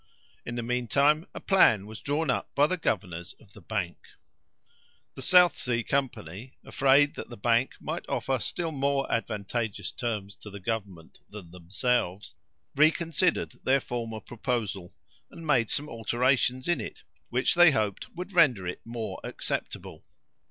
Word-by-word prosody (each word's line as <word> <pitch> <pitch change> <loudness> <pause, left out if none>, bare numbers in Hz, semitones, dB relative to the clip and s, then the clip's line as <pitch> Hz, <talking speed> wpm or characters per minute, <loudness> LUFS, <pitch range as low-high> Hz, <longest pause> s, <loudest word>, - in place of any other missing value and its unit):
In 120 - -4
the 120 - -2
mean 125 +1 -1
time, 150 - +3
a - - -4
plan 115 - +4
was 110 +1 -9
drawn 145 0 0
up - - -3
by 145 - +5
the 185 - 0
governors 90 - -3
of 100 -3 -21
the 100 - -14
bank. 90 -2 -3 1.2
The - - -9
South 180 +5 +5
Sea 120 -2 -1
Company, 125 -5 -3
afraid 140 +2 +4
that - - -8
the 120 - -9
bank 120 +4 +2
might - - -5
offer 135 -1 0
still 165 +7 -2
more 140 -1 0
advantageous 110 -1 -2
terms 105 -5 -4
to 105 - -11
the 100 0 -9
government 95 -5 -5
than 100 -5 -10
themselves, 95 +2 -1 0.4
reconsidered 165 +3 +2
their 135 +1 +4
former 115 -3 -4
proposal, 110 -7 -3 0.3
and 165 - -11
made 120 -7 +3
some 145 +1 -1
alterations 125 +2 +1
in 175 -1 +1
it, - - -8 0.3
which 125 +2 +2
they 175 -1 +8
hoped 105 -8 -1
would 180 +3 -6
render 130 - +4
it 90 - -5
more 115 -1 -5
acceptable. - - -5
120 Hz, 150 wpm, -28 LUFS, 105-140 Hz, 1.2 s, they